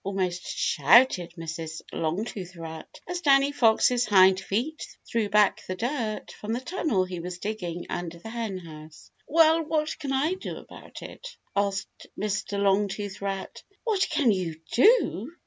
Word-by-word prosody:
almost 185 -2 -2 0.2
shouted 175 - +4
Mrs. 160 -1 -5
Longtooth 180 +2 -3
Rat, 160 -1 -9
as 355 0 -3
Danny 275 -2 +4
Fox's 245 -1 +3
hind 190 -2 +6
feet 240 +12 -2 0.2
threw 225 -3 0
back 210 -1 +3
the 185 - -3
dirt 230 -1 -3
from 215 +2 -5
the 240 - -1
tunnel 260 - 0
he 180 -1 -6
was 175 +1 -6
digging 180 -4 -4
under 170 -1 -5
the 220 +6 -9
Henhouse. 170 -9 -7 0.2
"Well, 325 +1 +5
what 310 0 -1
can 280 -3 -4
I 280 +6 +1
do 375 - -6
about - - -12
it?" - - -9 0.3
asked 200 -1 -2
Mr. 205 -1 -2
Longtooth 200 0 0
Rat. 195 -1 -4 0.2
"What 425 -5 +1
can 270 -8 +3
you 175 -5 -2
do?" 320 - +4
205 Hz, 145 wpm, -26 LUFS, 180-260 Hz, 0.3 s, hind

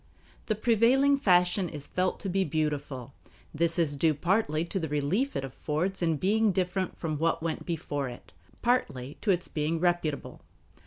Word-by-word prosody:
The 215 - +1
prevailing 245 +6 +4
fashion 180 - +3
is 145 -2 -7
felt 185 0 -1
to - - -4
be 190 +1 +1
beautiful. 145 -5 -2 0.4
This 165 +2 +1
is 155 -4 +2
due 155 +2 +2
partly 170 -1 +1
to 190 +3 -3
the 160 -3 -3
relief 155 - 0
it 135 - -1
affords 155 +8 -2
in 165 -3 +1
being 210 +6 +2
different 185 0 -1
from 155 -3 -3
what 165 0 +1
went 165 -1 -3
before 145 -5 -2
it, 120 - -11 0.3
partly 150 - 0
to 215 - -2
its 180 -2 +2
being 155 +2 -1
reputable. 175 -4 -1
170 Hz, 165 wpm, -28 LUFS, 150-195 Hz, 0.4 s, prevailing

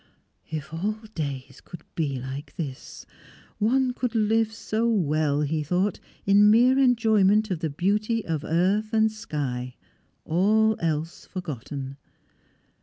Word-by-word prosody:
If 155 -1 -5
all 200 +6 -1 0.2
days 140 -6 -5
could 175 - -11
be 140 -5 -2
like 135 +3 -7
this! 140 -6 -7 0.5
One 250 +4 +2
could 245 -2 -3
live 220 0 +2
so 225 +1 -1
well, 155 -7 +1
he 155 +1 0
thought, 180 +6 0 0.3
in 205 +1 +6
mere 245 +5 +5
enjoyment 220 -5 +3
of 175 - -1
the 160 - -2
beauty 210 +8 0
of 160 -3 -2
earth 195 +7 +1
and 220 0 +3
sky, 140 - -4 0.5
all 215 +6 +3
else 160 0 -3
forgotten. 140 - -6
185 Hz, 125 wpm, -25 LUFS, 150-220 Hz, 0.5 s, in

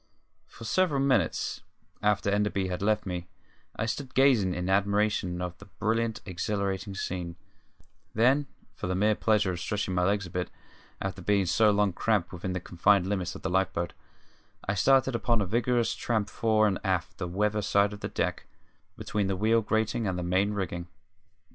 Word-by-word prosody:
For - - -13
several 160 +2 +1
minutes 130 - +1 0.4
after 105 -1 +2
Enderby 100 -2 0
had 90 0 -3
left 105 +1 +1
me 90 -2 -4 0.5
I 115 - -1
stood 130 +3 -4
gazing 125 -9 +4
in 90 0 -3
admiration 100 -2 +1
at 90 -1 -6
the 100 - -12
brilliant, 110 +2 -1
exhilarating 100 +1 -2
scene; 90 -3 -4 0.8
then, 130 +6 +3 0.3
for - - -5
the 95 - -1
mere 105 +3 +3
pleasure 105 -3 +2
of 90 - -4
stretching 100 0 -2
my 90 0 +1
legs 100 +1 +1
a 90 - -10
bit, 90 +1 -2 0.5
after 95 -1 -4
being 100 -1 +2
for 90 - -2
so 110 +4 +5
long 105 -2 +2
cramped 100 -3 0
within 90 +1 -4
the 90 - -2
confined 90 +2 +2
limits 95 -2 -2
of - - -10
the 95 - -1
life 95 0 +2
boat, 85 - -2 0.7
I 100 - +1
started 135 +5 +3
upon 115 0 +1
a 100 - +1
vigorous 120 +3 +1
tramp 110 -3 -1
fore 110 -1 +2
and 100 -3 +1
aft 95 -4 -1
the 90 - -2
weather 105 +4 0
side 100 +1 +2
of 105 - -8
the - - -4
deck, - - -2 0.5
between 105 -3 -1
the 95 - 0
wheel 110 +4 +3
grating 110 +1 0
and 90 -1 -1
the 90 - -3
main 95 +4 +1
rigging. 85 -3 -3
100 Hz, 185 wpm, -28 LUFS, 95-110 Hz, 0.8 s, so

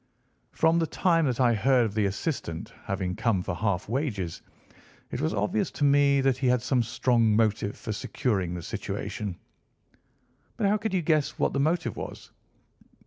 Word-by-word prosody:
From 160 +1 +3
the 165 - +1
time 165 -3 +2
that 125 -1 -1
I 120 -2 +4
heard 125 +2 +3
of 105 - -3
the 105 -1 +1
assistant 100 - -4
having 95 -2 -2
come 105 -6 +1
for - - -3
half 100 0 -1
wages, 105 - -2 0.7
it - - -3
was 80 - +1
obvious 105 +1 0
to - - -3
me 140 -1 +4
that 135 -2 +2
he 130 - +1
had 125 -1 +2
some 130 -1 +2
strong 115 -1 +2
motive 105 -2 +1
for 110 - -5
securing 95 -5 -1
the 85 - -6
situation." 100 +2 -4 1.2
"But - - 0
how 205 +2 +3
could 210 -1 -2
you 180 - +1
guess 155 -2 +1
what - - +1
the 140 - 0
motive 160 +5 0
was?" - - -8
120 Hz, 175 wpm, -27 LUFS, 100-140 Hz, 1.2 s, I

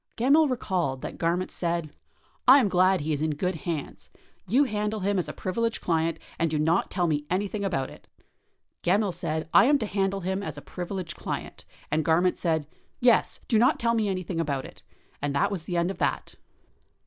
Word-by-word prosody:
Gemmill 285 +6 +4
recalled 180 - -1
that - - -6
Garment 175 +2 0
said, 170 -3 -2 0.6
"I 260 +2 +10
am 240 -8 +3
glad 185 -1 +3
he 155 +1 -1
is 145 - -2
in 155 -1 0
good 180 +5 -1
hands. 165 -6 -5 0.4
You 255 +9 +4
handle 210 -3 -2
him 200 0 +1
as 180 - -2
a - - -2
privileged 230 +4 -2
client 165 -1 0 0.2
and 165 -1 +2
do 155 - -1
not 160 +4 +2
tell 180 -1 0
me 150 -3 -1
anything 200 +3 -1
about 150 -9 -1
it. - - -15 0.7
[Gemmill] 195 +3 +2
said 160 -2 -3
I - - +8
am 290 +2 +5
to 245 - -2
handle 195 -1 -1
him 190 +2 -2
as 155 -6 -6
a - - -7
privileged 180 -1 -5
client, - - -6 0.3
and 155 +1 +1
[Garment] 175 +4 +2
said 160 -3 0 0.3
'yes, 245 -2 +3
do 225 - +3
not 250 +6 +4
tell 230 -1 +2
me 220 -3 +1
anything 185 -2 -3
about 140 -5 -1
it,' - - -13 0.4
and 145 0 -1
that 140 - +2
was 180 -5 -4
the 175 - -2
end 170 +2 +1
of - - -9
that." - - -1
180 Hz, 200 wpm, -27 LUFS, 160-205 Hz, 0.7 s, I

